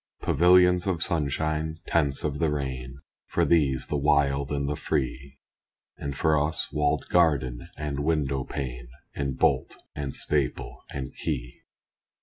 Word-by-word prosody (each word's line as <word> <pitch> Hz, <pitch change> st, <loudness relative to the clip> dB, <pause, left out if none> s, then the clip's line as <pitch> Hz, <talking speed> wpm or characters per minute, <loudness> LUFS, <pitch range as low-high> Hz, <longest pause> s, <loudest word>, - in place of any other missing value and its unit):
Pavilions 90 Hz, +1 st, +4 dB
of 85 Hz, -4 st, +1 dB
sunshine 80 Hz, 0 st, -1 dB
tents 70 Hz, -5 st, +1 dB
of 75 Hz, -1 st, -2 dB
the 80 Hz, -2 st, +2 dB
rain, 65 Hz, -2 st, -4 dB, 0.3 s
For -, -, +1 dB
these, 70 Hz, -6 st, +2 dB
the 75 Hz, -, -1 dB
wild 70 Hz, -1 st, +2 dB
and 70 Hz, -1 st, -1 dB
the 75 Hz, -, -1 dB
free; 70 Hz, 0 st, -3 dB, 0.6 s
And 70 Hz, -1 st, -5 dB
for 75 Hz, -2 st, +3 dB
us 80 Hz, +1 st, -2 dB
walled 75 Hz, -1 st, 0 dB
garden 70 Hz, -8 st, +2 dB
and 75 Hz, -2 st, -3 dB
window 70 Hz, -3 st, 0 dB
pane, 60 Hz, -4 st, -5 dB, 0.3 s
And 70 Hz, -2 st, -3 dB
bolt -, -, +2 dB, 0.2 s
and 70 Hz, -2 st, -3 dB
staple 70 Hz, -4 st, -2 dB
and 65 Hz, -2 st, -5 dB
key. -, -, -4 dB
70 Hz, 135 wpm, -27 LUFS, 70-80 Hz, 0.6 s, Pavilions